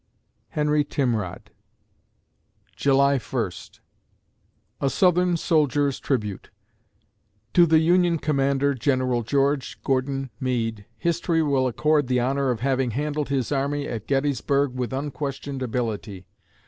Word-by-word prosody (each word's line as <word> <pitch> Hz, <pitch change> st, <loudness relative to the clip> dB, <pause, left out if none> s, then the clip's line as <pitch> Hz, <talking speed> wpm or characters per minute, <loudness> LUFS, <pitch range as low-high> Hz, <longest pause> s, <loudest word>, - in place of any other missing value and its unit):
HENRY 150 Hz, 0 st, +1 dB
TIMROD 120 Hz, -10 st, -2 dB, 1.2 s
July 140 Hz, 0 st, +3 dB
First 115 Hz, -8 st, -5 dB, 1.0 s
A 140 Hz, -, +1 dB
SOUTHERN 180 Hz, +1 st, +3 dB
SOLDIER'S 145 Hz, -4 st, +1 dB
TRIBUTE 105 Hz, -8 st, -2 dB, 1.0 s
To 175 Hz, -1 st, +6 dB
the 160 Hz, 0 st, +5 dB
Union 175 Hz, +1 st, +3 dB
commander, 140 Hz, -2 st, +1 dB
General 130 Hz, -1 st, 0 dB
George 140 Hz, +3 st, 0 dB
Gordon 135 Hz, 0 st, -1 dB
Meade, 115 Hz, -5 st, -2 dB
history 170 Hz, +3 st, 0 dB
will 135 Hz, -3 st, +2 dB
accord 150 Hz, +3 st, +1 dB
the 125 Hz, 0 st, +1 dB
honor 135 Hz, +2 st, 0 dB
of 120 Hz, -3 st, -1 dB
having 130 Hz, -1 st, +1 dB
handled 145 Hz, +4 st, -2 dB
his 135 Hz, -3 st, -1 dB
army 140 Hz, +1 st, -1 dB
at 110 Hz, -2 st, -5 dB
Gettysburg 140 Hz, 0 st, +1 dB
with 125 Hz, -1 st, -3 dB
unquestioned 140 Hz, 0 st, -4 dB
ability. 110 Hz, -6 st, -3 dB
135 Hz, 110 wpm, -24 LUFS, 125-145 Hz, 1.2 s, To